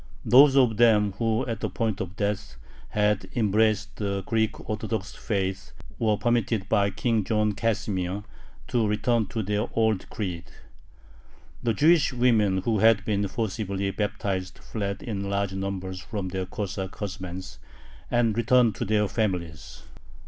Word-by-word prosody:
Those 135 +2 +7
of 120 -5 +4
them 110 -3 +5
who, 115 +1 +1
at 115 -2 -3
the - - -2
point 110 -3 -2
of 90 -1 -5
death, 100 - -2 0.3
had 105 -1 +1
embraced 110 -1 +1
the 100 -2 -2
Greek 110 -2 -1
Orthodox 110 -2 -3
faith, 95 -2 -3 0.3
were 110 -2 +2
permitted 115 -4 0
by 100 -1 +2
King 110 +2 0
John 105 +1 +1
Casimir 105 -3 -1 0.5
to 115 -3 +2
return 110 +1 +1
to 110 +1 -3
their 105 +2 -1
old 110 -3 +1
creed. 90 -6 -4 1.2
The 115 -2 0
Jewish 155 - +4
women 110 -7 +2
who 110 -1 +1
had 110 -1 +4
been 100 -1 0
forcibly 100 -2 -2
baptized 100 -3 -3
fled 100 -2 -4
in 100 -4 -3
large 100 -1 -1
numbers 95 -1 -4
from 100 -3 -4
their 95 0 -3
Cossack 95 -1 -4
husbands, 95 -2 -6 0.5
and 115 -3 +2
returned 120 -1 +4
to - - -2
their 105 0 +2
families. 90 -8 -3
105 Hz, 140 wpm, -26 LUFS, 95-115 Hz, 1.2 s, Those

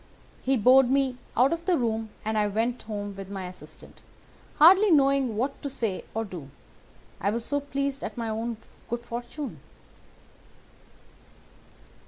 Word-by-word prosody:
He 265 0 +2
bowed 255 +3 +6
me 265 -2 +1 0.2
out 260 +6 +5
of 335 0 -5
the 360 -2 +3
room 225 -2 -1 0.2
and 220 0 -1
I 210 -1 +2
went 230 +4 -1
home 205 -2 -5
with 195 -1 -8
my 195 -2 -5
assistant, 180 0 -11 0.5
hardly 380 +7 +7
knowing 275 - +3
what 270 +5 -2
to 285 - -3
say 225 -8 -3
or 225 0 -1
do, 175 -9 -8 0.7
I 200 - +1
was 230 +2 -2
so 285 -1 0
pleased 280 -1 -3
at - - -5
my 230 -1 -2
own 225 +1 -3 0.3
good 235 0 -3
fortune. 240 +5 -6
240 Hz, 150 wpm, -27 LUFS, 215-275 Hz, 0.7 s, hardly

